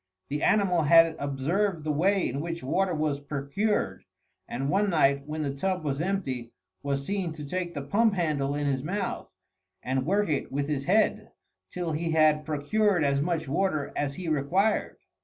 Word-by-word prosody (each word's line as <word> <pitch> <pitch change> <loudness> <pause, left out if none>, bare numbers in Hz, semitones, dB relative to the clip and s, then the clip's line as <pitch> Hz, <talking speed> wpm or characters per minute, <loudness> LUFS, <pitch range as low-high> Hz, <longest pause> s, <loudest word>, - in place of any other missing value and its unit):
The 145 +2 -2
animal 190 -5 +3
had 165 +2 +6
observed 155 +6 -1
the 155 - -1
way 185 +6 +2
in 135 +3 -3
which 170 -1 -5
water 180 +6 0
was 150 -2 -1
procured, 140 - -2 0.4
and 135 +3 -3
one 200 +8 +2
night, 140 -4 +2
when 155 0 -3
the 140 -2 -2
tub 185 +4 -2
was 140 -1 -1
empty, 135 -11 -3 0.3
was 140 -1 -2
seen 190 -3 -2
to 150 -2 -8
take 175 +3 -3
the 140 - -3
pump 210 +8 +2
handle 145 -5 0
in 145 0 -1
his 135 -2 0
mouth, 190 +7 -3 0.5
and 130 +1 0
work 200 +7 +1
it 145 -4 -2
with 140 +1 -1
his 140 -2 -2
head 215 +5 +1 0.4
till 175 -2 -3
he 165 +2 -2
had 155 -1 +3
procured 175 +5 +1
as 140 -1 +2
much 165 -1 -1
water 155 -1 -1
as 140 -1 -2
he 185 -2 -6
required. 170 +8 +1
155 Hz, 175 wpm, -27 LUFS, 140-185 Hz, 0.5 s, had